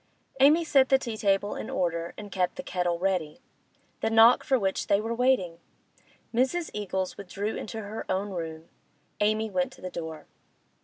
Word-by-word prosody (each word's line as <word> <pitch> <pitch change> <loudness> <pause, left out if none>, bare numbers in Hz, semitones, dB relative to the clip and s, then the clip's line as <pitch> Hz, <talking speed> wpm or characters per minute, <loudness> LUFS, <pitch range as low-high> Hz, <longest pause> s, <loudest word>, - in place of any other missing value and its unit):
Amy 300 +5 +6
set 270 -4 +4
the 270 - +6
tea 235 -4 -5
table 200 -1 +1
in - - -6
order, 170 -1 -2
and 205 -1 -9
kept 180 -1 0
the - - -6
kettle 175 -2 -1
ready.... 180 -4 -1 0.6
The - - 0
knock 225 +2 +6
for 265 - +2
which 195 -4 -1
they 200 - +3
were 225 +2 -2
waiting! 235 -9 +1 0.7
Mrs. 265 +8 +1
Eagles 190 -3 -3
withdrew 200 +2 -4
into 220 0 -5
her 210 +2 -6
own 195 +2 -1
room; 165 -2 -6 0.5
Amy 215 +1 +1
went 180 -1 0
to - - -16
the 185 - -6
door. 160 -3 -6
200 Hz, 170 wpm, -27 LUFS, 180-225 Hz, 0.7 s, Amy